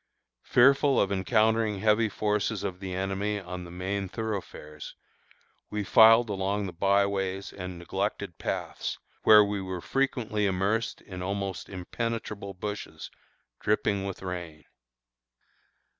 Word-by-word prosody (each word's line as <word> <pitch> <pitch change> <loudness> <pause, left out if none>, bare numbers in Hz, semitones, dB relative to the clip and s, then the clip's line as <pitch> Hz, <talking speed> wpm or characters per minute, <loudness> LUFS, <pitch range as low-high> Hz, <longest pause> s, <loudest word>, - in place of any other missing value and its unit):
Fearful 140 +2 +5
of 100 - +2
encountering 110 +2 +2
heavy 110 +2 +3
forces 105 0 -1
of 90 -1 -4
the 95 -1 -5
enemy 95 +2 -1
on 90 -1 -7
the - - -10
main 95 +2 -3
thoroughfares, 95 -9 -6 0.7
we 105 0 -2
filed 115 +4 +7
along 100 0 -1
the 90 - -6
by 100 +2 +3
ways 95 -1 -3
and 90 -2 -6
neglected 85 0 -3
paths, - - -3 0.3
where 105 -1 +9
we 100 -1 -2
were 95 -1 -4
frequently 110 -3 0
immersed 100 +4 0
in 90 -2 -8
almost 95 -1 -3
impenetrable 100 +1 -4
bushes 100 -5 -6 0.5
dripping 105 -1 +1
with 95 -1 -5
rain. 85 -4 -6
100 Hz, 125 wpm, -28 LUFS, 95-105 Hz, 0.7 s, where